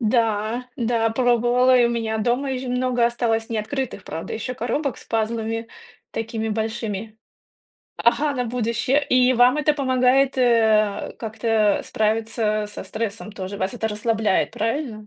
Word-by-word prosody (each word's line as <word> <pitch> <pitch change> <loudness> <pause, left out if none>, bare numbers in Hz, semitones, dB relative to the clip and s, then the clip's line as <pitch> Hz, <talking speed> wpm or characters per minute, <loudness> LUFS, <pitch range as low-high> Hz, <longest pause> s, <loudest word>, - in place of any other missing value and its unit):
Да, 225 +1 0
да, 230 -1 +1
пробовала, 245 +1 +3
и 240 - +5
у - - +3
меня 225 -2 -2
дома 250 +5 0
ещё 255 -1 -3
много 250 -1 +1
осталось 225 -2 -1
неоткрытых, 230 0 -3
правда, 165 - -5
ещё 250 +3 -4
коробок 255 +2 -2
с - - -13
пазлами 225 0 -2 0.4
такими 225 0 -3
большими. 220 -1 -3 0.8
Ага, 285 +5 +2
на 250 -1 -1
будущее. 245 +4 0
И 255 0 +5
вам 250 +4 +5
это 300 0 +2
помогает, 260 0 +2
э, 220 -4 +2
как-то 220 -2 +1
справиться 215 0 0
со 210 - -8
стрессом, 220 -1 -5
тоже 195 0 -6
вас 190 +5 -2
это 220 -2 -2
расслабляет, 215 -1 0
правильно? 225 -1 -3
230 Hz, 140 wpm, -22 LUFS, 220-250 Hz, 0.8 s, и